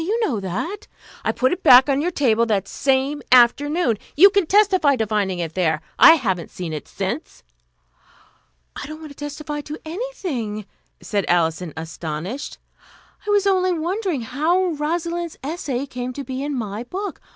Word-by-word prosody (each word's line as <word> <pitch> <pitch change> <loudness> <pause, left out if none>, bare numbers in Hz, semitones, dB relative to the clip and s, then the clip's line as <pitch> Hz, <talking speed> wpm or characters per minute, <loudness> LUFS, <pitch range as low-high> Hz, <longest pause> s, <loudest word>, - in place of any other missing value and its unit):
You 425 +7 -1
know 260 - 0
that." 250 - -4 0.4
"I - - +1
put 255 +1 +1
it 365 - -5
back 260 -4 +8
on 275 0 +1
your 345 - 0
table 235 -8 +2
that 200 -3 0
same 275 +4 0
afternoon. 255 - +4 0.2
You 390 +6 +8
can 400 -4 +2
testify 375 -8 +4
to 225 -3 -1
finding 205 -3 -1
it 165 -2 -4
there. 160 -3 0 0.2
I 325 - +10
haven't 190 - -2
seen 175 -3 -6
it 150 - -6
since." - - -5 1.3
"I - - -6
don't 310 +1 -7
want 310 -2 -10
to - - -13
'testify' 295 +1 -5
to 295 +2 -7
anything," 315 - -4 0.4
said 200 -2 -1
Alison, 170 0 +1
astonished. 165 - -5 0.7
"I - - -2
was 410 -1 +3
only 370 -2 +2
wondering 350 - -2
how 315 +10 +1
Rosalind's 335 +2 -3
essay 280 -4 -3
came 250 -2 -5
to 280 - -6
be 265 0 -5
in 290 0 -3
my 215 -2 -4
book. 390 +11 -6
280 Hz, 165 wpm, -21 LUFS, 215-340 Hz, 1.3 s, I